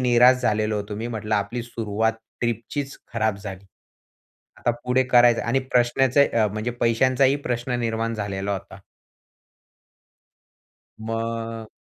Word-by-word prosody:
निराश 125 0 +6
झालेलो 110 -1 +1
होतो. 105 0 -4
मी 115 +3 -4
म्हटलं 110 -2 -2
आपली 105 +4 -1
सुरुवात 110 -1 -1 0.3
ट्रिपचीच 120 +4 -3 0.2
खराब 110 -3 0
झाली. 100 -1 -8 0.9
आता - - +1
पुढे 125 +1 +3
करायच? 120 -2 +5
आणि 120 +3 +1
प्रश्नाचे 130 +3 +4 0.2
म्हणजे 110 +3 -2
पैशांचाही 130 +4 +3
प्रश्न 120 +1 -1
निर्माण 115 0 -1
झालेला 100 -2 -3
होता. 95 0 -7 2.2
मग 115 0 -4
115 Hz, 110 wpm, -24 LUFS, 110-125 Hz, 2.2 s, निराश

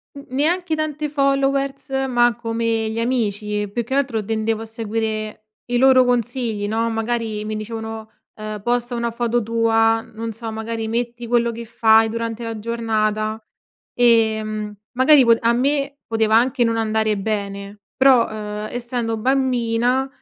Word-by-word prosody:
N 280 - -10
neanche 320 +6 0
tante 305 -1 -3
followers, 275 -1 0 0.2
ma 240 -2 +3
come 230 -1 -1
gli 225 - -3
amici 210 -4 -1
e 205 - -4
più 235 +4 -2
che 265 +4 -3
altro 250 -6 0
tendevo 220 +1 -1
a - - -6
seguire 220 -1 -4 0.2
i 245 0 -1
loro 260 0 +6
consigli, 240 -3 -1
no, 225 +2 0
magari 225 -1 -2
mi 215 0 -3
dicevano, 220 0 -6 0.2
uhm, 215 -1 -6
posta 240 +1 0
una 235 0 -1
foto 240 0 0
tua, 225 0 +2
non 225 0 -7
so 225 +1 -7
magari 220 0 -4
metti 235 +1 -3
quello 235 0 +2
che 230 0 -7
fai 225 -1 +4
durante 230 0 -4
la 225 -1 -5
giornata. 215 -1 -1 0.5
Ehm, 220 -3 +2 0.2
magari 260 +1 +6
pot 230 -1 +5
a 230 - +3
me 280 +3 0
poteva 220 -1 +2
anche 245 +2 +3
non 230 -1 +1
andare 220 -1 0
bene 200 0 -4
però, 265 -3 +6
uhm, 210 0 -5
essendo 240 -2 -3
bambina, 250 0 +1
230 Hz, 150 wpm, -21 LUFS, 220-245 Hz, 0.5 s, loro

